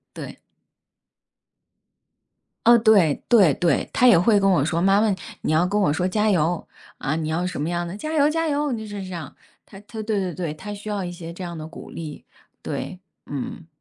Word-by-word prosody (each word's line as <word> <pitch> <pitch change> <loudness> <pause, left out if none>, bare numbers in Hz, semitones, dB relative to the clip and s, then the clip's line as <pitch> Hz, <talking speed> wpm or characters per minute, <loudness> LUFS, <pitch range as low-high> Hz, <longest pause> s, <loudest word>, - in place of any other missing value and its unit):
对。 - - -8 2.3
嗯， 235 0 +7
对 190 -10 +5
对 200 -10 +6
对， 170 +4 +1
她 250 - +4
也 235 -7 +8
会 205 +4 +4
跟 195 0 +3
我 175 -7 +3
说， 165 +2 0
妈 195 +3 +4
妈， 215 -2 +3 0.3
你 - - -2
要 160 +3 +3
跟 205 +3 0
我 180 -8 +3
说 180 +4 0
加 210 +3 +1
油。 170 -2 +1 0.3
啊， 150 +2 -1
你 160 -1 -2
要 165 +3 -1
什 180 -5 -3
么 150 - -1
样 175 0 -2
的， 180 +4 -6
加 310 +8 -5
油 295 -1 +4
加 325 +1 0
油， 295 -1 0
那 230 - -2
就 220 - -7
是 205 -1 -6
这 185 - -8
样。 165 -6 -7 0.3
她 195 - -14
对 220 +2 -9
对 200 -4 -1
对， 165 -2 -4
她 200 +7 -8
需 205 +1 -8
要 205 -2 -2
一 175 - -4
些 170 -1 -8
这 175 - -9
样 170 -2 -6
的 155 - -6
鼓 160 - -11
励， 155 -3 -8 0.4
对， 185 - -5 0.3
嗯， 145 +3 -6
185 Hz, 225 characters per minute, -23 LUFS, 165-210 Hz, 2.3 s, 也